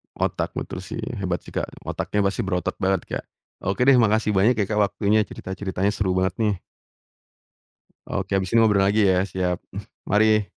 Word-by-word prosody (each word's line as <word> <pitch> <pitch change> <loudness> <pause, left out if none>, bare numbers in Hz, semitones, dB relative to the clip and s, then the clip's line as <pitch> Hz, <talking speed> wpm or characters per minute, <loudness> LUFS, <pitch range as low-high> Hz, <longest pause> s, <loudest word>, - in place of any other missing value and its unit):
Otak - - -1
betul - - -5
sih. 95 +5 -6 0.2
Hebat 90 -3 -2
sih - - -13
Kak. - - -2 0.2
Otaknya 105 - -2
pasti 100 0 0
berotot 90 -2 -2
banget 95 -1 +1
Kak. - - -3 0.4
Oke 100 +6 -1
deh 135 -2 +7
makasih 110 -1 +3
banyak 110 +6 +5
ya - - +1
Kak 105 - -1
waktunya 105 +2 +1
cerita-ceritanya 95 +1 -3
seru 100 -3 0
banget 95 -1 0
nih. 105 -3 +2 1.5
Oke 100 - -2
habis 95 -1 -1
ini 115 - +5
ngobrol 105 -3 +4
lagi 105 +2 +3
ya. 95 0 +3
Siap. 90 -2 -1 0.5
Mari. 105 0 +3
100 Hz, 170 wpm, -23 LUFS, 95-110 Hz, 1.5 s, deh